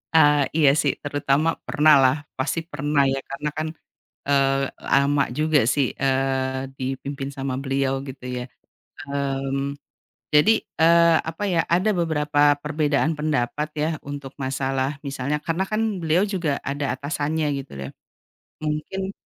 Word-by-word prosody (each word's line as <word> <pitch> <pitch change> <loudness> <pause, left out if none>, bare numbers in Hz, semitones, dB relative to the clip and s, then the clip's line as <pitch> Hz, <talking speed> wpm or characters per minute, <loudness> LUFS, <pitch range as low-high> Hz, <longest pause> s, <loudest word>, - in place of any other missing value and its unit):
Eee, 145 -2 +6
iya 150 -4 +6
sih, 140 - +1
terutama 145 +2 0
pernahlah 145 -2 +4 0.2
pasti, 145 +5 -1
pernah 145 -2 0
ya, 135 0 +1
karena 145 +2 -3
kan, 155 +2 -3 0.6
eee, 135 -1 +3 0.2
lama 140 +1 +3
juga 155 +1 +2
sih, 130 +3 +1
eee, 130 0 0
dipimpin 135 +1 -4
sama 135 -1 -3
beliau 135 0 -1
gitu 130 -2 -8
ya. 125 -1 -3 0.6
Mmm, 140 0 -2 0.6
jadi, 205 +10 +6 0.2
eee, 170 0 +6
apa 165 +5 -5
ya, 175 -4 +2
ada 185 +5 +2
beberapa 150 -4 +2
perbedaan 150 +1 0
pendapat 150 -1 -1
ya, 150 +1 +1
untuk 140 -1 -7
masalah 135 +1 -1
misalnya 140 +1 -2
karena 170 +5 -2
kan 215 -3 -1
beliau 165 +4 +2
juga 175 -8 -1
ada 140 -2 -2
atasannya 150 +2 -2 0.2
gitu 135 - -12
loh. 70 0 -6 0.7
Mungkin, 155 +6 -3
145 Hz, 130 wpm, -23 LUFS, 135-155 Hz, 0.7 s, Eee